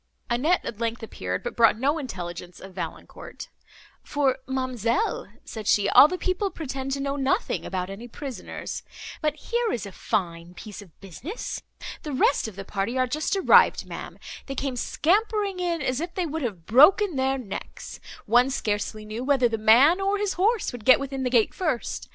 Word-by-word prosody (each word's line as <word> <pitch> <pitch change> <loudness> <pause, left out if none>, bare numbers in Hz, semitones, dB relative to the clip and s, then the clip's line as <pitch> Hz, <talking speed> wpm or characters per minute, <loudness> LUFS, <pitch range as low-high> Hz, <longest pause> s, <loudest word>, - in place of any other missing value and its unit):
Annette 300 +10 +2
at 220 - -6
length 230 0 -2
appeared, 90 - -4
but - - -5
brought 230 -2 +5
no 285 +6 +1
intelligence 175 - -7
of 190 0 -11
Valancourt, - - -8 0.5
"For, 275 -3 0
ma'amselle," 260 - -1 0.2
said 220 -3 -7
she, 205 -1 +3
"all 285 - +9
the 365 - -3
people 370 +2 -1
pretend 270 -5 -5
to 275 - -2
know 275 0 -2
nothing 285 - 0
about 185 -1 -3
any 200 +5 -8
prisoners. 265 +2 -6 0.4
But 305 -2 0
here 475 -1 -1
is 225 - -3
a 200 - -8
fine 175 -2 -3
piece 210 +1 -9
of 185 -6 -17
business! 235 - -6 0.4
The 300 - -5
rest 265 -1 +2
of 215 - -9
the 195 0 -7
party 205 +6 -2
are 255 - +3
just 305 +9 -1
arrived, 385 - +5
ma'am; - - -8 0.3
they 275 - -5
came 270 -1 -2
scampering 400 - 0
in, 340 -4 -1
as 255 +2 -1
if 345 +2 -5
they 365 -3 0
would 320 0 -4
have 195 - -4
broken 315 - +6
their 265 0 +1
necks; 225 -7 -8 0.3
one 245 +4 +4
scarcely 215 -3 -2
knew 215 +3 -5
whether 265 -2 +3
the 225 -1 -3
man, 260 - +6
or 395 +1 +1
his 410 -1 -1
horse 425 +5 +1
would 245 -3 -9
get 255 +3 +7
within 275 -1 -4
the 255 - 0
gates 235 -3 +2
first. 310 -10 -2
260 Hz, 185 wpm, -25 LUFS, 215-320 Hz, 0.5 s, all